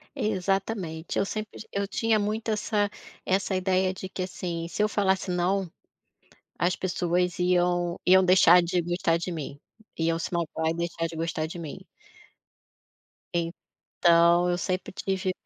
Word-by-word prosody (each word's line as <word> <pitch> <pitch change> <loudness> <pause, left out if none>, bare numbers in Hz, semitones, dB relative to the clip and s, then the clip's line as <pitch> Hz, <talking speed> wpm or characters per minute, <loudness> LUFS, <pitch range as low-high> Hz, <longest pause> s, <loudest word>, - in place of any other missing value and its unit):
Exatamente, 195 - -2
eu 195 - +2
sempre 215 +1 -5
ti - - -11
eu 200 0 -1
tinha 220 +2 +1
muito 215 +2 -2
essa 210 -1 0 0.4
essa 190 +1 +1
ideia 185 0 +1
de 190 0 -7
que, 185 - -4
assim, 170 -2 -4
se 210 - -1
eu 215 - +2
falasse 190 -2 +1
não, 180 0 0 0.9
as 175 +1 +2
pessoas 180 -1 -1
iam 175 0 +1
iam 190 +1 +7
deixar 180 -1 +7
de 175 +1 0
gostar 170 -1 0
de 170 +2 -4
mim, 145 -4 -6 0.4
iam 165 0 +1
se 165 - -4
magoar 160 -2 -1
e - - -2
deixar 170 0 -2
de 165 0 -8
gostar 160 -1 -2
de 170 +2 -8
mim. 170 +3 -7 2.0
Então 170 +1 +4
eu 175 - +1
sempre 185 0 -2
tive 190 0 -2
180 Hz, 150 wpm, -27 LUFS, 170-195 Hz, 2.0 s, iam